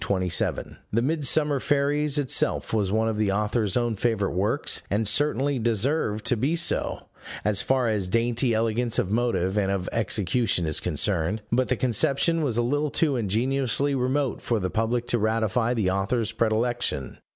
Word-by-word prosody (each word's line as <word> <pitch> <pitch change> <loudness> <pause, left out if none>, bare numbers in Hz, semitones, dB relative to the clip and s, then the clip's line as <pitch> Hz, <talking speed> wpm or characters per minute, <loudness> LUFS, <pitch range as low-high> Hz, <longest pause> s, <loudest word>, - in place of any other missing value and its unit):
The 115 +3 +1
Midsummer 150 0 +2
Fairies 145 +1 0
itself 140 -5 0
was 100 -4 0
one 110 +1 +1
of 110 -1 -2
the 105 -2 +1
authors 105 0 0
own 120 -2 0
favorite 105 -3 -1
works, 95 +4 0
and 105 +2 0
certainly 145 +1 +1
deserved 115 -1 0
to - - +3
be 135 +9 0
so, 170 0 0 0.4
as 105 -1 +2
far 130 -2 +1
as 105 -4 -1
dainty 115 +4 +1
elegance 115 +1 0
of 95 - 0
motive 105 -4 0
and 95 -2 0
of 95 -2 -2
execution 110 -3 0
is 80 -1 +1
concerned: 100 +2 0
but 125 +2 +1
the 130 - 0
conception 140 +7 +1
was 130 -7 -1
a 120 - +2
little 145 +5 0
too 145 -1 +1
ingeniously 130 +5 0
remote 135 +1 -1
for 115 -2 -1
the 95 -2 -3
public 115 +2 -1
to 120 - 0
ratify 115 +2 0
the 100 -5 0
author's 100 +3 -1
predilection. 110 - -1
115 Hz, 165 wpm, -25 LUFS, 105-130 Hz, 0.4 s, to